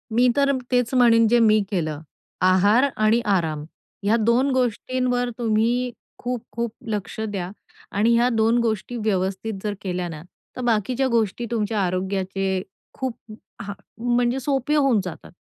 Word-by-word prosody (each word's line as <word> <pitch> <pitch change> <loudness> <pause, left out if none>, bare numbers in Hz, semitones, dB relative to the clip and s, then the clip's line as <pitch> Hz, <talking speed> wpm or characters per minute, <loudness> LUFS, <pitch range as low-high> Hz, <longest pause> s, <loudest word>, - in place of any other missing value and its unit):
मी 245 +1 +5
तर 280 -1 +3 0.2
तेच 245 -1 +1
म्हणेन 230 -3 +5
जे 240 +2 +4
मी 215 -1 +5
केलं. 155 -5 -2 0.4
आहार 200 +7 +5
आणि 215 +2 +3 0.2
आराम 155 -4 -1 0.4
ह्या 210 +3 +3
दोन 235 +5 +2
गोष्टींवर 250 0 0
तुम्ही 235 +2 +1 0.3
खूप-खूप 235 -1 -4 0.2
लक्ष 210 0 -4
द्या 200 -5 -3 0.5
आणि 225 +3 +4
ह्या 240 +1 +4
दोन 225 0 +2
गोष्टी 230 +1 -2
व्यवस्थित 200 0 -1
जर 210 -1 -1
केल्या 180 -2 -3
ना, 150 -2 -7 0.3
तर - - -5
बाकीच्या 240 +3 +1
गोष्टी 235 -1 0
तुमच्या 215 -2 0
आरोग्याचे 190 +1 -1 0.3
खूप 260 -3 -3 0.5
हां, 200 0 -5 0.4
म्हणजे 245 +2 +1
सोपे 270 +2 0
होऊन 275 -7 +3
जातात. 180 - -8
225 Hz, 140 wpm, -23 LUFS, 195-245 Hz, 0.5 s, मी